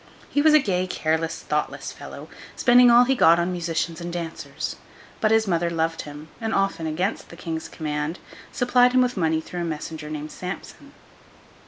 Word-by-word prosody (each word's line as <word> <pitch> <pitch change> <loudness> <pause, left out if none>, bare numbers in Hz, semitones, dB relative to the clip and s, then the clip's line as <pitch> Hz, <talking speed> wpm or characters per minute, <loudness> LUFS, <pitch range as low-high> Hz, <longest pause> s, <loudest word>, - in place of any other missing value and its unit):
He 290 - +2
was 305 0 +6
a - - +8
gay, 185 -7 0
careless, 160 -1 -1
thoughtless - - -2
fellow, - - -10 0.3
spending 245 0 +6
all 240 +1 +8
he 265 +2 +2
got 170 -10 +6
on 170 +1 0
musicians 165 -1 -2
and 170 0 -5
dancers; 170 -1 -5 0.4
but 215 - +2
his 220 0 +4
mother 170 -2 +1
loved 165 0 -1
him, 150 +1 -10
and 225 0 -1
often, 195 -5 0
against 180 +7 -2
the - - -11
King's 165 -2 -5
command, 150 +2 -3 0.3
supplied 245 0 +3
him 255 - +5
with 250 0 -1
money 160 -4 +1
through 175 +2 -6
a - - -1
messenger 160 -1 -5
named 155 0 -5
Samson. 180 +1 -8
170 Hz, 180 wpm, -24 LUFS, 160-225 Hz, 0.4 s, a